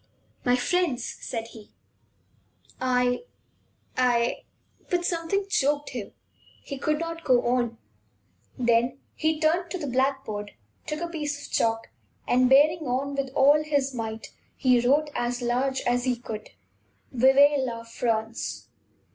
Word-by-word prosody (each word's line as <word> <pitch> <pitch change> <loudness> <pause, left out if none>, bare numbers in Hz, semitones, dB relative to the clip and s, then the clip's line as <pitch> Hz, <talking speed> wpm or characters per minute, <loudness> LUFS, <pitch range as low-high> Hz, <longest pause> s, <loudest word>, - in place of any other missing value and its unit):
"My 245 0 +3
friends," 260 -2 0
said 230 -1 -4
he, 220 -3 -13 1.1
"I 250 - +1 0.7
I 240 -2 +1 0.2
" - - -35
But 350 -1 0
something 345 +4 -1
choked 290 -5 +1
him. - - -6 0.5
He 275 - -6
could 305 +2 +1
not 330 +1 -5
go 250 -4 +3
on. 240 -2 0 0.8
Then 240 +1 +2 0.2
he 315 0 0
turned 340 +3 +1
to 370 - -3
the 310 - -5
blackboard, 260 -6 -1 0.3
took 305 +1 -3
a 345 - -1
piece 295 -4 -4
of - - -13
chalk, 225 0 +1 0.4
and, 250 +1 +4
bearing 300 +3 +5
on 270 +3 -1
with 275 -1 -2
all 285 +2 +6
his 285 -3 0
might, 225 -2 -5 0.2
he 255 -3 +3
wrote 290 +5 +2
as 240 0 -1
large 260 +3 0
as 245 +1 0
he 255 -1 +2
could: 220 -3 -7 0.6
"Vive 270 +3 +5
La 235 -3 -3
France!" 230 -1 -3
260 Hz, 140 wpm, -26 LUFS, 240-295 Hz, 1.1 s, all